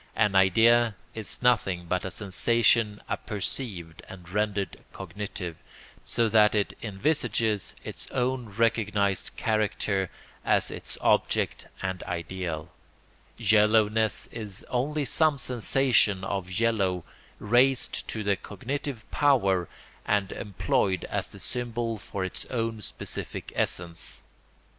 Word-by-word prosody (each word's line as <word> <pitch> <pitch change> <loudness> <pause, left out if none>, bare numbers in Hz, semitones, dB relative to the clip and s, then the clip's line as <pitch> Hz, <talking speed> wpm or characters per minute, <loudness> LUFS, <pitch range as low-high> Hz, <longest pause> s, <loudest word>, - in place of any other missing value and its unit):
An 105 -3 +3
idea 110 +4 +5 0.2
is 110 +2 -3
nothing 100 -8 +2
but 90 +2 -1
a 95 - -3
sensation 105 +3 +2
apperceived 95 -6 -3
and 90 -2 -11
rendered 100 +1 -2
cognitive, 95 -2 -6 0.5
so 115 -1 +1
that 110 -1 +5
it 105 -1 +1
envisages 110 - 0
its - - -7
own 125 -1 -1
recognised 105 -2 +1
character 105 -3 0 0.3
as - - +2
its - - -6
object - - +1 0.2
and 95 -1 -2
ideal: 85 -1 -4 0.7
yellowness 110 0 +3
is 105 -5 -5
only 145 +4 0
some 155 +2 +3
sensation 125 -6 +2
of 95 -1 -3
yellow 95 -4 +1 0.3
raised 125 +4 +2
to 110 - -3
the 100 0 +2
cognitive 120 +5 -5
power 100 - +3 0.3
and 100 -1 +1
employed 95 -1 0
as - - -1
the - - -12
symbol 120 -2 -3
for 95 -1 -4
its 95 - -4
own 115 -3 -2
specific - - -5
essence. 85 -1 -2
105 Hz, 110 wpm, -27 LUFS, 95-115 Hz, 0.7 s, idea